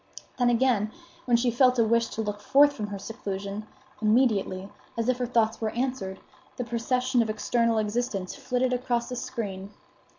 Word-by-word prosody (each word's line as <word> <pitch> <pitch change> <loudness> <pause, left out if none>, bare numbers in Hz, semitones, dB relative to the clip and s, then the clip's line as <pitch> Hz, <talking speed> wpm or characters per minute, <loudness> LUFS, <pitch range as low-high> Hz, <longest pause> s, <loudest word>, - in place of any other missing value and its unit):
Then 245 -1 +4
again, 235 -3 +2 0.3
when 240 -2 +4
she 240 +1 +1
felt 250 +1 +4
a 230 - +4
wish 230 +1 +2
to 220 - -4
look 205 -1 -4
forth 285 +5 +5
from 215 -7 -4
her 205 -1 -5
seclusion, 200 -1 -5 0.3
immediately, 215 -4 +2 0.3
as 230 +1 0
if 255 0 +1
her 245 - -1
thoughts 230 -2 +1
were 220 - 0
answered, 235 -6 -3 0.4
the 250 - -1
procession 245 +2 +1
of 225 - -1
external 230 +1 +1
existence 210 -3 -1
flitted 250 0 0
across 245 -1 -1
a - - -2
screen. 200 -6 -5
230 Hz, 170 wpm, -27 LUFS, 210-250 Hz, 0.4 s, forth